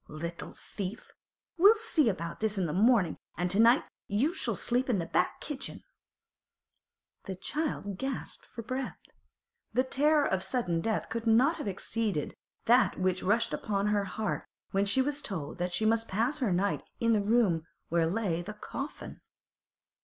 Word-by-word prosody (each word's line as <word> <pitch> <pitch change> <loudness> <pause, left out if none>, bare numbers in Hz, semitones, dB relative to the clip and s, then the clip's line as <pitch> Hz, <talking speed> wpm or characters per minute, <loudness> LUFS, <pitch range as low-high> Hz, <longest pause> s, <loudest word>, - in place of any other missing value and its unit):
Little 170 +3 -6
thief! 205 +3 -6 0.5
We'll 405 +5 +8
see 360 - +2
about 170 -4 -4
this 215 -1 0
in 190 - +1
the 150 - -2
mornin', 205 -3 +3 0.2
an' 180 +2 0
to 195 +4 +1
night 235 +3 +6 0.2
you 245 - +1
shall - - -1
sleep 250 +2 0
in 230 - +3
the 170 - -2
back 180 - 0
kitchen!' 290 -3 -5 1.4
The 190 - -4
child 205 - -3
gasped 270 -1 -4
for 230 - -8
breath. 255 +3 -4 0.8
The 255 +3 +3
terror 295 +3 +3
of 190 -1 0
sudden 180 -10 0
death 220 +3 -1
could 230 0 -3
not 255 +9 +4
have 295 - -5
exceeded 200 -3 -2 0.3
that 245 -2 +4
which 185 0 +1
rushed 230 +5 +1
upon 205 -1 -1
her 205 -1 +1
heart 215 +2 -3 0.2
when 195 +1 +2
she 260 +6 +4
was 290 +1 -1
told 185 - -5
that 180 0 -1
she 220 - 0
must 225 +1 +2
pass 235 +10 0
her 245 -8 +1
night 195 +3 +1 0.2
in 230 0 +3
the 210 - +3
room 200 -7 +2 0.2
where 165 -1 +2
lay 185 -4 -1
the 210 +4 -7
coffin. 275 +7 -7
220 Hz, 170 wpm, -30 LUFS, 185-255 Hz, 1.4 s, We'll